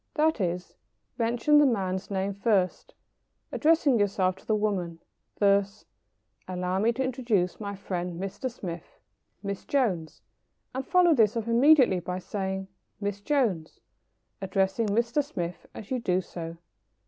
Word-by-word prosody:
That 315 -5 +2
is, 180 0 -2 0.5
mention 240 +6 +3
the 295 - +6
man's 190 -5 -1
name 195 0 -1
first, 200 -3 0 0.6
addressing 305 -6 +3
yourself 190 -2 +1
to - - -19
the 215 - +2
woman 195 -6 -1 0.4
thus: 200 0 +2 0.6
"Allow 180 0 -2
me 225 +3 +3
to 265 +3 -1
introduce 235 -8 0
my 200 -1 -5
friend 180 -3 -4
Mr. 195 +7 -4
Smith, 175 -8 -8 0.4
Miss 200 -1 -4
Jones." 195 - -1 0.5
And 265 +1 -3
follow 355 -2 +5
this 225 -4 +3
up 230 0 -3
immediately 245 -4 +5
by 180 +1 -4
saying, 190 0 -4 0.3
"Miss 205 -1 -3
Jones," 205 - 0 0.6
addressing 195 +3 0
Mr. 235 +7 +1
Smith 180 - -5
as 215 - -9
you 255 - 0
do 185 -5 +1
so. 170 -2 -7
200 Hz, 135 wpm, -27 LUFS, 185-235 Hz, 0.6 s, the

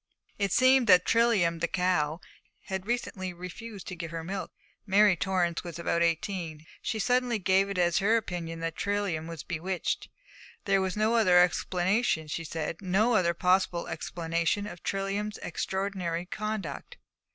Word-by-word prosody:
It 200 -2 0
seemed 255 +2 +5
that 180 -2 +7
Trilium, 210 -8 +3
the 170 - 0
cow, 180 -3 0 0.4
had 190 0 -5
recently 190 -6 -2
refused 185 +4 -8
to 185 - -5
give 165 -1 -6
her 165 0 -5
milk. 190 +3 -5 0.4
Mary 200 0 +5
Torrance 175 -2 0
was 170 -3 -7
about 170 0 0
eighteen; 165 -2 -1 0.2
she 225 - -2
suddenly 245 +2 +1
gave 195 0 +2
it 200 - -4
as 175 0 +3
her 215 +3 +3
opinion 170 -6 -4
that 165 0 -3
Trilium 200 -6 -1
was 165 -2 -7
bewitched; 180 +1 -3 0.6
there 195 -1 +3
was 190 +1 -2
no 215 +2 +2
other 185 -6 +5
explanation, 180 - +2
she 165 +2 -4
said, 160 +1 -4
no 200 +6 +2
other 170 -5 +2
possible 180 -1 +1
explanation 170 +4 -1
of 180 -4 -8
Trilium's 200 +2 -2
extraordinary 180 -1 -2
conduct. 210 -5 -5
185 Hz, 150 wpm, -29 LUFS, 170-205 Hz, 0.6 s, that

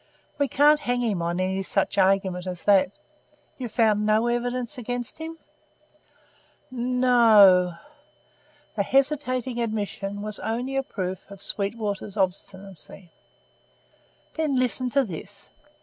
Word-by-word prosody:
We 285 - +2
can't 295 +3 +4
hang 245 -4 -1
him 210 -7 -1
on 170 +1 -2
any 190 +1 -1
such 195 +1 -1
argument 190 -1 +2
as 180 -2 -6
that. 195 -1 +3 0.6
You've 245 -4 -5
found 215 -3 +2
no 215 +2 +2
evidence 240 0 -2
against 245 +3 -5
him?" 325 +1 -6 1.3
"N 250 0 -2
no." 205 -8 +6 1.0
The 210 - +1
hesitating 260 -1 0
admission 205 -2 -3
was 215 0 -4
only 240 +6 -3
a 270 - +2
proof 190 -7 -5
of 200 -1 -11
Sweetwater's 205 0 -3
obstinacy. 190 -1 -4 1.2
"Then 310 -4 -1
listen 255 0 0
to 275 +2 +2
this. 200 0 -9
215 Hz, 120 wpm, -25 LUFS, 195-250 Hz, 1.3 s, no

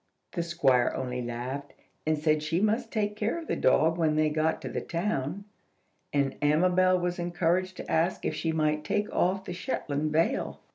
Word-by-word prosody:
The 175 - -2
Squire 150 -8 +2
only 125 -1 -3
laughed, 125 +4 -5 0.3
and 155 0 +2
said 155 0 +2
she 160 +3 0
must 220 +3 +1
take 210 -2 -1
care 215 +7 -1
of 335 - -6
the - - -1
dog 160 +6 +3
when 155 -2 +2
they 155 0 +2
got 155 +1 +1
to - - -4
the - - -3
town; 170 0 -2 0.7
and 140 -2 +1
Amabel 180 +5 +4
was 175 0 -2
encouraged 175 +2 0
to - - -6
ask 170 +3 +1
if - - 0
she 165 - -1
might 155 -1 +1
take 210 +5 -1
off 190 +2 +1
the 180 - -5
Shetland 155 - -2
veil. 165 - 0
165 Hz, 185 wpm, -28 LUFS, 150-185 Hz, 0.7 s, Amabel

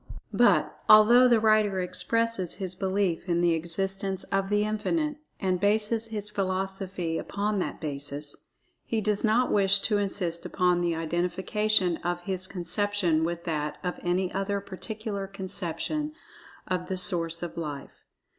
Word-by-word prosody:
But, - - +3
although 235 +4 +8
the 235 -2 +4
writer 215 -3 +3
expresses 230 +1 0
his 185 -3 -3
belief 190 -2 -1
in 170 0 +2
the 175 -1 +3
existence 190 +3 -1
of 195 0 0
The 205 0 +2
Infinite, 295 +9 -1 0.2
and 185 -2 0
bases 215 +3 +1
his 210 -2 -5
philosophy 190 -3 -2
upon 205 0 -2
that - - -3
basis, 145 -1 -4 0.5
he 225 - -1
does 210 -1 -1
not 235 +3 +3
wish 200 -1 +5
to 210 -1 +1
insist 185 -4 -2
upon 180 -2 +1
the 170 -1 0
identification 180 +3 +1
of 175 0 -3
his 185 0 -3
conception 180 -2 0
with 170 +1 -2
that 150 -3 -2
of 180 -1 -3
any 180 +1 0
other 195 +1 -1
particular 200 +1 -5
conception 195 - -4 0.5
of 180 -1 -2
the 190 - -2
Source 170 -2 +1
of 175 - -5
Life. 150 -4 -6
190 Hz, 145 wpm, -27 LUFS, 175-210 Hz, 0.5 s, although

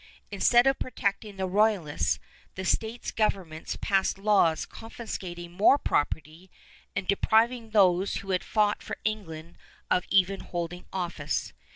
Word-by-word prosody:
Instead 240 +5 +4
of 270 0 +3
protecting 205 -3 -2
the 190 - -1
Royalists, 195 -5 +1 0.4
the 190 - -5
States 225 +4 -1
Governments 185 -7 -2
passed 195 -1 +1
laws 195 -6 +3
confiscating 185 -7 -7
more 205 +10 +5
property 160 - -2 0.5
and 200 -2 -2
depriving 225 +3 +2
those 190 -3 +3
who 195 -1 -4
had 185 - 0
fought 210 -2 +1
for - - -6
England 170 -7 -4 0.3
of 180 - +2
even 195 0 +3
holding 175 0 -5
office. 170 -5 -3
195 Hz, 130 wpm, -28 LUFS, 175-215 Hz, 0.5 s, more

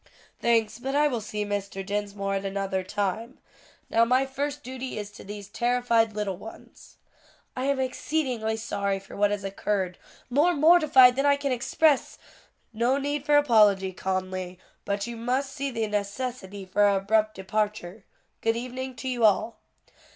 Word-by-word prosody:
"Thanks, 230 -1 +2
but 270 +3 -3
I 295 +1 +4
will 245 -6 -2
see 210 0 -4
Mr. 200 -1 -4
Dinsmore 200 -1 -2
at 195 0 -1
another 195 -1 -2
time. 205 +5 -3 0.5
Now 230 - +3
my 255 +3 +3
first 285 +2 -4
duty 260 -1 -6
is 205 -1 -5
to 205 - -12
these 205 0 -8
terrified 235 0 +1
little 205 -3 -3
ones." 220 +4 -13 0.6
"I 255 - -2
am 280 -1 +1
exceedingly 255 -4 -1
sorry 200 -3 -2
for 195 - -13
what 205 0 +3
has 205 -1 -3
occurred; 195 -2 -2 0.3
more 300 +8 +3
mortified 295 -5 +6
than 275 +2 +1
I 285 - +5
can 280 -1 -2
express 280 +4 +1 0.3
" - - -40
"No 255 +3 +3
need 285 +1 -3
for 295 0 +6
apology, 210 -8 +4
Conly; 185 -1 -3 0.3
but 200 0 -1
you 235 - -6
must 255 +4 -1
see 280 -1 -3
the 225 -4 -2
necessity 205 -1 -4
for 185 +2 0
our 200 -1 +5
abrupt 215 +2 +1
departure. 205 0 -3 0.4
Good 225 0 +1
evening 255 +1 -5
to 255 +3 -6
you 245 -2 -1
all." 220 +2 +3
225 Hz, 165 wpm, -26 LUFS, 200-260 Hz, 0.6 s, mortified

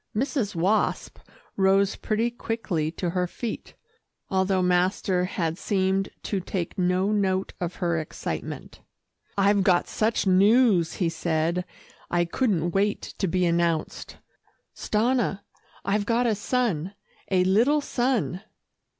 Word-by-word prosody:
Mrs. 240 - -1
Wasp 190 +6 0 0.4
rose 195 0 +3
pretty 225 +2 -1
quickly 225 -9 -2
to 175 0 -2
her 180 0 0
feet, 225 +5 -6 0.6
although 190 0 +2
master 180 +1 +1
had 165 -1 -2
seemed 190 -1 0
to 200 - -1
take 180 -1 -4
no 185 +2 +1
note 190 -2 0
of 175 0 -3
her 170 -2 0
excitement. 155 - -6 0.6
"I've 200 0 +4
got 185 -2 +3
such 220 0 0
news," 195 -1 +4
he 180 - 0
said, 165 +1 -1 0.4
"I 175 0 +2
couldn't 175 -3 0
wait 200 +3 -1
to 195 - +1
be 180 +1 +1
announced. 170 -2 -1 0.6
Stanna, 220 -2 0 0.4
I've 205 +1 0
got 235 +1 +2
a 230 - +3
son 205 - -1 0.3
a 185 -2 +3
little 230 +11 +3
son." 240 -9 -1
190 Hz, 125 wpm, -25 LUFS, 175-215 Hz, 0.6 s, I've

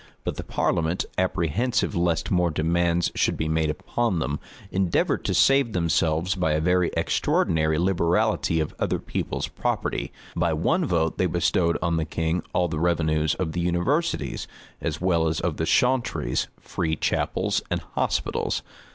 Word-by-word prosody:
But - - -3
the - - -4
parliament, 85 +2 0
apprehensive 95 - 0
lest 85 -2 0
more 90 -2 +3
demands 85 +2 +1
should - - +1
be 80 - -1
made 80 0 +1
upon 105 +6 -1
them, 75 -2 -2 0.3
endeavored 95 -2 +1
to - - 0
save 135 -4 +4
themselves 85 +1 +1
by 90 -5 0
a 75 - +1
very 90 +2 +2
extraordinary 80 -1 +1
liberality 85 -2 +1
of 80 - -2
other - - 0
people's - - -3
property; - - -2 0.2
by 85 -1 +1
one 165 - +1
vote 80 - 0
they 90 - +3
bestowed 85 0 +1
on 85 -2 +1
the 80 - 0
king 80 +2 -1
all 90 - +1
the 80 -2 -3
revenues 80 -2 +1
of 90 -4 -2
the 85 - -2
universities, 110 - 0 0.3
as 75 -2 -2
well 85 -3 +2
as 80 0 0
of 85 -4 -2
the 80 - -1
chauntries, 125 - +1
free 80 -2 -2
chapels,[] - - 0
and - - -1
hospitals. - - -1
85 Hz, 155 wpm, -25 LUFS, 80-90 Hz, 0.3 s, save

